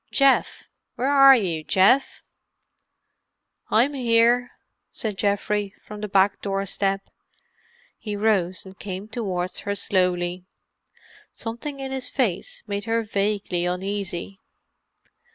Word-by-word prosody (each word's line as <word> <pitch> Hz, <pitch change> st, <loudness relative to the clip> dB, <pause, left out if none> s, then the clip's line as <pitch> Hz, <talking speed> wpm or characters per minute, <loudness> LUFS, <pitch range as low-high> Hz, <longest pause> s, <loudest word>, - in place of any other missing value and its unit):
"Geoff! 275 Hz, -1 st, +2 dB, 0.3 s
Where 265 Hz, +3 st, 0 dB
are 275 Hz, -1 st, +8 dB
you, 175 Hz, -9 st, -1 dB
Geoff?" 195 Hz, -, +3 dB, 1.5 s
"I'm 245 Hz, +7 st, +3 dB
here," 240 Hz, -1 st, +3 dB, 0.4 s
said 215 Hz, -3 st, -4 dB
Geoffrey, 205 Hz, 0 st, 0 dB
from 210 Hz, -1 st, -9 dB
the 210 Hz, -, -3 dB
back 195 Hz, 0 st, +2 dB
doorstep. 195 Hz, 0 st, -1 dB, 1.0 s
He 210 Hz, -2 st, -4 dB
rose 200 Hz, -4 st, +1 dB
and 190 Hz, +1 st, -13 dB
came 195 Hz, +1 st, -6 dB
towards 190 Hz, -6 st, -3 dB
her 200 Hz, 0 st, -3 dB
slowly. 180 Hz, -2 st, 0 dB, 0.8 s
Something 240 Hz, +5 st, -6 dB
in 270 Hz, -1 st, -5 dB
his 265 Hz, -1 st, -1 dB
face 215 Hz, -9 st, -2 dB
made 205 Hz, -1 st, -4 dB
her 230 Hz, 0 st, 0 dB
vaguely 200 Hz, -4 st, -1 dB
uneasy. 190 Hz, 0 st, -4 dB
205 Hz, 110 wpm, -24 LUFS, 190-230 Hz, 1.5 s, are